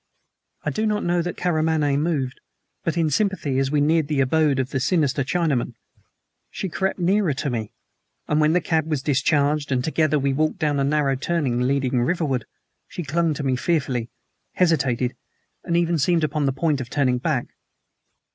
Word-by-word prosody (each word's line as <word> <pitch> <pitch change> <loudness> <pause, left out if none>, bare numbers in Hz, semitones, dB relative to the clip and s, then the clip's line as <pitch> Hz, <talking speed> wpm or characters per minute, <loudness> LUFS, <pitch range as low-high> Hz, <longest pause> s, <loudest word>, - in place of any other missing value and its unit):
I - - -1
do 220 +1 -1
not 210 0 0
know 175 0 +1
that 175 0 -4
Karamaneh 155 -4 +1
moved; 145 -4 -1 0.4
but 165 0 -1
in 160 -2 +1
sympathy, 155 -7 0
as 135 0 +1
we 145 0 +1
neared 155 0 +2
the 150 -2 -1
abode 145 +1 +2
of 130 0 -2
the 135 - -1
sinister 145 -1 +1
Chinaman, 150 -3 0 0.7
she 190 - -4
crept 190 +3 -1
nearer 180 -3 +1
to 140 +1 -2
me, 110 -2 -3 0.6
and 150 +1 +2
when 155 +1 +3
the 180 - +3
cab 160 -1 0
was 145 -4 -1
discharged, 145 0 +1
and 125 -1 +1
together 155 0 +1
we 140 -1 0
walked 155 +6 0
down 150 -5 0
a - - +2
narrow 140 -1 +1
turning 135 -3 -1
leading 130 -1 +1
riverward, 135 -4 0 0.4
she 175 - -6
clung 160 0 0
to 145 - -4
me 130 -2 +1
fearfully, 130 -6 -1 0.4
hesitated, 130 -8 +1 0.5
and 170 -2 0
even 170 -1 +1
seemed 165 +3 +2
upon 150 -2 0
the - - +2
point 145 0 0
of 120 - -7
turning 130 -3 +1
back. 135 -3 -1
150 Hz, 180 wpm, -23 LUFS, 135-165 Hz, 0.7 s, when